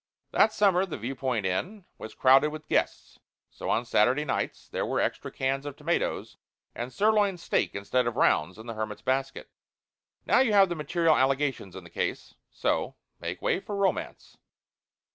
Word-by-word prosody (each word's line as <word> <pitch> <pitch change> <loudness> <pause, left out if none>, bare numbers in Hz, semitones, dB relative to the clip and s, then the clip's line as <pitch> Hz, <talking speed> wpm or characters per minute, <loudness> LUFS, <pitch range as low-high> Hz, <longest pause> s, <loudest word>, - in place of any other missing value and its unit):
That 220 - +4
summer 195 -4 +3
the 175 - -5
Viewpoint 125 -2 -2
Inn 180 - -3
was 110 - -9
crowded 135 +3 +5
with 155 0 -9
guests. - - -1 0.3
So, - - -6
on 120 - +1
Saturday 125 +7 +2
nights, 135 - -3
there - - -3
were - - -1
extra - - -2
cans 135 +1 -1
of 145 -1 -6
tomatoes, 160 +4 -2 0.4
and 120 +2 -5
sirloin 205 -1 +2
steak, 170 - -1
instead 120 +5 0
of 120 - -2
"rounds," 75 +7 +2
in 110 - -11
the 115 - -5
hermit's 110 -1 -5
basket. 135 +1 -2 0.7
Now - - +4
you 250 -5 +3
have 195 -2 +6
the 175 - -2
material 160 +1 +2
allegations 135 -7 0
in 95 - -8
the 85 - -14
case. - - -3 0.2
So, - - -1 0.2
make 85 +2 -6
way - - +1
for 205 +1 -6
Romance. 200 -1 -2
135 Hz, 170 wpm, -27 LUFS, 115-175 Hz, 0.7 s, have